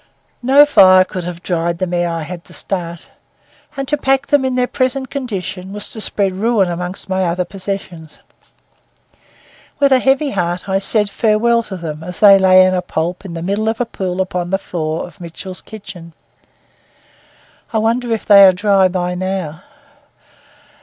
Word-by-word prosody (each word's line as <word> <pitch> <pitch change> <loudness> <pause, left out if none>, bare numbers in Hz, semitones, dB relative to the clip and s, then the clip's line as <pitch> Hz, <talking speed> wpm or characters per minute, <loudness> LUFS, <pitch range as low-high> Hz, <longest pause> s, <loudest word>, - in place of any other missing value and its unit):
No 270 +4 +6
fire 185 -9 +6
could 185 -2 -6
have 175 0 -7
dried 170 -1 -1
them 180 0 -3
ere 175 0 0
I 165 -1 -3
had 170 +2 -8
to - - -13
start; 170 -3 -4 0.7
and 275 0 -3
to 295 - 0
pack 270 -1 +1
them 285 -2 +2
in 260 -1 -1
their 250 0 +2
present 260 +1 -2
condition 195 -7 -5
was 210 0 -5
to 220 - -5
spread 200 -2 0
ruin 205 -1 +1
among 180 +2 -4
my 190 0 0
other 180 +1 -1
possessions. 185 -4 -7 1.6
With 280 -1 +3
a 260 - +5
heavy 270 +3 +1
heart 175 -1 -2
I 195 0 +1
said 210 +1 0
farewell 230 +2 +2
to 195 -4 -8
them 160 -2 -6
as 180 +1 -8
they 200 -2 +7
lay 185 0 +6
a 185 -1 +1
pulp 175 +1 -3
in 170 -3 -7
the 165 - -5
middle 205 +4 -1
of 225 - -3
a 245 - 0
pool 190 -4 -3
upon 180 -2 -3
the 195 - +1
floor 165 -4 -4
of 180 +2 -15
Mitchell's 180 +2 -8
kitchen. 180 -6 -11 1.6
I 225 - -1
wonder 230 +2 0
if 225 - -2
they 200 -1 +8
are 190 - +8
dry 195 0 +3
by 180 -1 -2
now. 180 -3 -4
190 Hz, 175 wpm, -17 LUFS, 175-220 Hz, 1.6 s, they